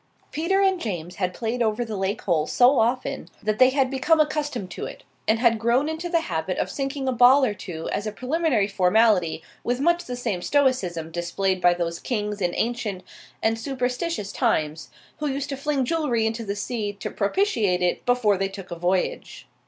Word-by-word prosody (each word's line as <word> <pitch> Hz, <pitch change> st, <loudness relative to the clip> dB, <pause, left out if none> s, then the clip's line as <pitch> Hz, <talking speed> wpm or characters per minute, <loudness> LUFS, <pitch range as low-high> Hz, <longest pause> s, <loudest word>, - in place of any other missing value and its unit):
Peter 380 Hz, +5 st, +1 dB
and 380 Hz, -2 st, +2 dB
James 180 Hz, -5 st, -4 dB
had 185 Hz, -2 st, 0 dB
played 230 Hz, +5 st, -3 dB
over 230 Hz, +1 st, +1 dB
the 220 Hz, -2 st, -5 dB
lake 195 Hz, +1 st, -2 dB
hole 160 Hz, -5 st, +1 dB
so 255 Hz, +2 st, +4 dB
often 245 Hz, +3 st, -1 dB
that 215 Hz, 0 st, -1 dB
they 255 Hz, 0 st, +7 dB
had 265 Hz, -1 st, +1 dB
become 305 Hz, +4 st, +2 dB
accustomed 295 Hz, -10 st, -1 dB
to -, -, -5 dB
it, -, -, -11 dB, 0.2 s
and 220 Hz, -, +4 dB
had 230 Hz, -1 st, +3 dB
grown 240 Hz, +6 st, +2 dB
into 320 Hz, +2 st, -4 dB
the 335 Hz, -1 st, +2 dB
habit 170 Hz, -, -3 dB
of -, -, -1 dB
sinking 275 Hz, -1 st, -3 dB
a -, -, +2 dB
ball 255 Hz, +3 st, +6 dB
or 215 Hz, -, 0 dB
two 165 Hz, -5 st, -7 dB
as 205 Hz, -, -2 dB
a -, -, -2 dB
preliminary 255 Hz, -3 st, 0 dB
formality 190 Hz, -4 st, +2 dB, 0.2 s
with 245 Hz, +1 st, -1 dB
much 345 Hz, +4 st, +2 dB
the 250 Hz, -, -4 dB
same 205 Hz, -7 st, -2 dB
stoicism 190 Hz, -, +1 dB
displayed 180 Hz, +3 st, -1 dB
by 175 Hz, -, +6 dB
those 170 Hz, -1 st, -3 dB
kings 210 Hz, -4 st, -3 dB
in 175 Hz, -1 st, 0 dB
ancient 225 Hz, -5 st, -2 dB, 0.4 s
and 225 Hz, 0 st, +1 dB
superstitious 250 Hz, -, -2 dB
times 155 Hz, +1 st, 0 dB, 0.3 s
who 300 Hz, -1 st, -2 dB
used 275 Hz, 0 st, -3 dB
to 275 Hz, -, -2 dB
fling 275 Hz, -1 st, -1 dB
jewellery 255 Hz, -7 st, 0 dB
into 225 Hz, +1 st, -2 dB
the 200 Hz, -2 st, -3 dB
sea 205 Hz, -1 st, -3 dB
to 200 Hz, -, -6 dB
propitiate 205 Hz, -, +1 dB
it 175 Hz, -, 0 dB
before 245 Hz, -5 st, +2 dB
they 195 Hz, 0 st, 0 dB
took 195 Hz, -1 st, -10 dB
a -, -, -3 dB
voyage. 180 Hz, +2 st, -2 dB
225 Hz, 195 wpm, -24 LUFS, 190-270 Hz, 0.4 s, they